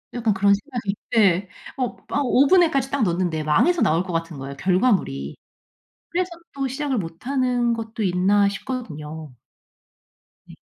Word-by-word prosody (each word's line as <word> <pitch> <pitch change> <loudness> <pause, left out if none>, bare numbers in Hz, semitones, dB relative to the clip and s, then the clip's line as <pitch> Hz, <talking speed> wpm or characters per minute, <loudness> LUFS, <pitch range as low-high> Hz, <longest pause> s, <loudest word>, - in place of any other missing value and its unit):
약간 225 -3 +1
그런 200 +1 +4
생각이 215 -3 -4 0.2
예. 195 -3 +3 0.3
어 255 -2 -2
막 285 - 0
오븐에까지 275 +1 +4
딱 280 -4 +1
넣었는데 170 -4 0
망해서 310 - +3
나올 165 +3 +3
것 185 - -6
같은 165 -2 -3
거예요, 135 +1 -7
결과물이. 180 - +1 0.8
'그래서 360 +2 0 0.3
또 275 -1 -2
시작을 270 -1 -2
못 165 +1 -7
하는 250 -3 +1
것도 225 0 -5
있나?' 195 +2 +3
싶거든요. 160 - -6 1.1
네. - - -12
205 Hz, 305 characters per minute, -23 LUFS, 170-255 Hz, 1.1 s, 그런